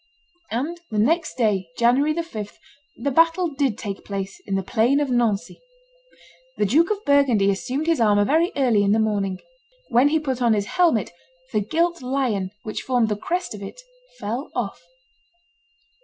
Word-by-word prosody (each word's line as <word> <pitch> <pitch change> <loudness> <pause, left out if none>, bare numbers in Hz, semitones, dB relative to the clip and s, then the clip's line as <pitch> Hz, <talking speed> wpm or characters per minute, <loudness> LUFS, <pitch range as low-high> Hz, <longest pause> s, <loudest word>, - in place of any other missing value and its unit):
And 300 +10 -3
the 215 - -4
next 315 +10 +1
day, 205 -7 0
January 255 +6 +3
the 335 +2 -1
5th, 215 -11 -7 0.4
the 280 +5 -2
battle 330 +4 +3
did 275 -6 -1
take 200 -2 -6
place, 195 -1 -5
in 195 - -1
the 195 - -1
plain 235 +8 +2
of 285 -3 -1
Nancy. 235 -2 0 1.0
The - - +2
Duke 310 - +3
of 425 -1 -2
Burgundy 265 -9 +4
assumed 255 +9 -3
his 330 -6 +1
armor 205 -2 +4
very 325 - +2
early 245 -7 +3
in 200 0 +3
the 220 - +2
morning. 200 -4 0 0.5
When 250 +2 +4
he 310 +2 +2
put 265 -4 -3
on 235 -2 +4
his 205 -1 -1
helmet, 325 - +1 0.4
the 215 - +3
gilt 335 - 0
lion, 250 -7 -1
which 215 - -4
formed 245 -4 +1
the 210 - 0
crest 355 - -3
of 210 - -9
it, 200 - -8 0.4
fell 240 +7 -4
off. - - -3
245 Hz, 170 wpm, -23 LUFS, 210-300 Hz, 1.0 s, Burgundy